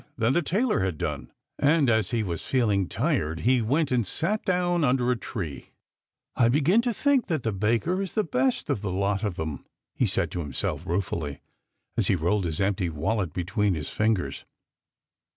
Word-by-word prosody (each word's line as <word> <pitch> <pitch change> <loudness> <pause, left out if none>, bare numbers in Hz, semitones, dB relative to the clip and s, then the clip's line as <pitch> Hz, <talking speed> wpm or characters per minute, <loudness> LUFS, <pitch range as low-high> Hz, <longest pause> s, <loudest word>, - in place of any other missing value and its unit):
than 115 +2 +2
the 175 - +3
tailor 195 - +1
had 95 -4 -1
done, - - -4 0.3
and 145 0 +4
as 110 -4 +2
he 115 -3 0
was 85 -5 -3
feeling 105 -8 +1
tired 80 +1 0
he 125 +1 +3
went 140 +6 +1
and 120 -5 +1
sat 205 - -1
down 175 -2 +1
under 125 -2 +2
a - - +2
tree. 85 - -6 0.3
" - - -67 0.3
I 115 - +4
begin 155 - +4
to 240 0 0
think 275 +3 +2
that 160 - -1
the 115 - 0
baker 115 - 0
is 195 - -4
the 215 - +2
best 130 -5 0
of 100 - -1
the 105 - -3
lot 100 +2 0
of 100 -4 -1
them," 80 -4 -4 0.3
he - - +1
said - - 0
to 90 - -4
himself 75 -5 -3
ruefully, 85 -5 -2 0.6
as - - +2
he - - +3
rolled 90 +4 0
his 80 -2 -2
empty 95 -2 +1
wallet 85 +4 -1
between 95 +3 0
his 75 -2 -4
fingers. 110 -4 0
110 Hz, 190 wpm, -26 LUFS, 90-145 Hz, 0.6 s, and